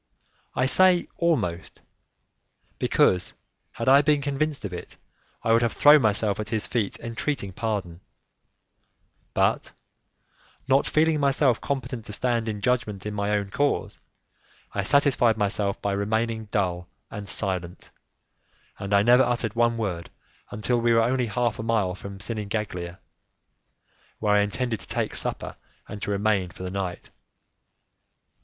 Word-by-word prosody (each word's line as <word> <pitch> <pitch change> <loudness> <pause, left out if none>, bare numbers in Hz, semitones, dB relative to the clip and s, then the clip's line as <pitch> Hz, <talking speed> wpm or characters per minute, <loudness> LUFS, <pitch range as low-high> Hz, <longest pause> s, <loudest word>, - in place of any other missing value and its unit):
I 130 - +2
say 180 +6 +4
almost, 145 - -1 1.0
because, 90 -1 +2 0.4
had 115 - -5
I 135 +2 +7
been 150 0 +2
convinced 145 -2 -2
of 95 - -5
it, 90 - -8 0.5
I 115 - +3
would 115 - +4
have 120 -1 0
thrown 150 0 +7
myself 105 -2 +1
at 110 0 -4
his 110 -2 0
feet 110 -5 -2
entreating 115 -3 -3
pardon; 100 -6 -3 1.3
but, - - +1 0.9
not 135 +1 +3
feeling 155 0 +2
myself 135 -3 +2
competent 130 -4 -4
to 105 - -6
stand 115 -1 0
in 105 -1 -5
judgment 105 -5 -1
in 105 - -4
my 100 0 -2
own 100 -1 -1
cause, 145 +5 -1 0.7
I - - -1
satisfied 130 -6 +3
myself 100 -1 0
by 100 - 0
remaining 110 +3 -1
dull 90 -4 -2 0.2
and 100 -1 -7
silent, 90 -4 -1 0.9
and 100 +1 0
I 100 - +4
never 120 +3 +6
uttered 120 -3 0
one 115 0 +2
word 90 -7 -3 0.4
until 120 +3 -1
we 120 0 +3
were 115 0 +4
only 125 +1 0
half 120 +1 -1
a - - -1
mile 110 -5 0
from 100 0 -9
Sinigaglia, 100 -4 -4 1.2
where 105 -1 +1
I 105 - +5
intended 110 +3 -2
to - - -7
take - - -1
supper - - -1 0.3
and 105 - -8
to - - -4
remain 100 -2 +1
for 90 +1 -10
the 90 - -4
night. 95 -2 -5
110 Hz, 145 wpm, -25 LUFS, 100-125 Hz, 1.3 s, I